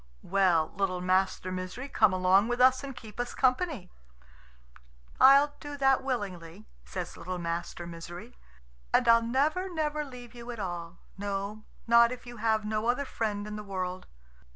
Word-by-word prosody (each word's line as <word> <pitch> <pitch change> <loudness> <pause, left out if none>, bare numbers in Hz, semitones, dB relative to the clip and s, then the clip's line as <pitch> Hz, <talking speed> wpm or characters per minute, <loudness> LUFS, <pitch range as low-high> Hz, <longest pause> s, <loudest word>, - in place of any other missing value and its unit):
"Well, 180 -4 +2
little 190 -2 0
Master 185 0 +1
Misery, 185 +8 -5
come 215 -7 +3
along 185 +3 +4
with 240 0 -2
us 255 +1 +5
and 270 -2 -6
keep 220 -2 -12
us 245 0 -3
company." 255 - 0 1.3
"I'll 280 +2 +7
do 290 -1 -7
that 270 -1 +3
willingly," 200 -7 -4 0.2
says 180 -2 -6
little 185 +1 -5
Master 170 0 -4
Misery, 175 +7 -9 0.6
"and - - +3
I'll 230 0 +7
never, 300 +11 0
never 305 -2 -1
leave 250 -4 -11
you 240 0 -10
at 235 -2 -6
all 175 -2 -5 0.2
no, 200 +1 -4 0.2
not 235 0 +6
if 250 0 -7
you 240 0 -9
have 220 -1 +1
no 215 +1 -1
other 250 +4 +1
friend 210 -5 -3
in 210 0 -6
the 210 - -6
world." 185 -2 -4
215 Hz, 160 wpm, -29 LUFS, 185-250 Hz, 1.3 s, I'll